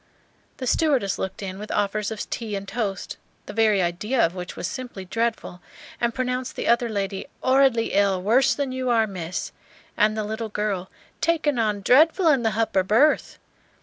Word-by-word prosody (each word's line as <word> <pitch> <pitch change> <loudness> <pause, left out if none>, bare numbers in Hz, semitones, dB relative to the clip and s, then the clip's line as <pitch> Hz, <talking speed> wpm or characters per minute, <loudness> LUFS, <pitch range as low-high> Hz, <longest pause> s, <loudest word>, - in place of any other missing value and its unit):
The 260 - -5
stewardess 260 - +1
looked 190 +1 -4
in 190 0 -5
with 210 - -7
offers 205 0 0
of 220 -2 -5
tea 220 -3 -3
and 195 0 -5
toast, 200 -2 -3 0.3
the - - -8
very 215 -3 +3
idea 210 +9 -1
of 165 - -2
which 180 -1 -7
was - - -5
simply 240 -3 -6
dreadful, 225 -3 -2 0.4
and 235 0 +1
pronounced 250 +1 -3
the - - -3
other 235 0 +3
lady 195 -2 -3 0.2
"'orridly 260 -3 +3
ill, 200 -2 +3
worse 240 +9 +3
than 280 -2 -2
you 255 0 -2
are, 230 -2 +3
Miss," 185 -4 -5 0.4
and 215 +1 +2
the 215 - -1
little 220 +1 -4
girl 200 -3 -2 0.3
"takin' 310 -6 +1
on 210 -3 0
dreadful 320 - +5
in 275 -5 +4
the 225 -2 0
h'upper 220 -3 +1
berth." 230 +11 +2
220 Hz, 180 wpm, -24 LUFS, 195-250 Hz, 0.4 s, dreadful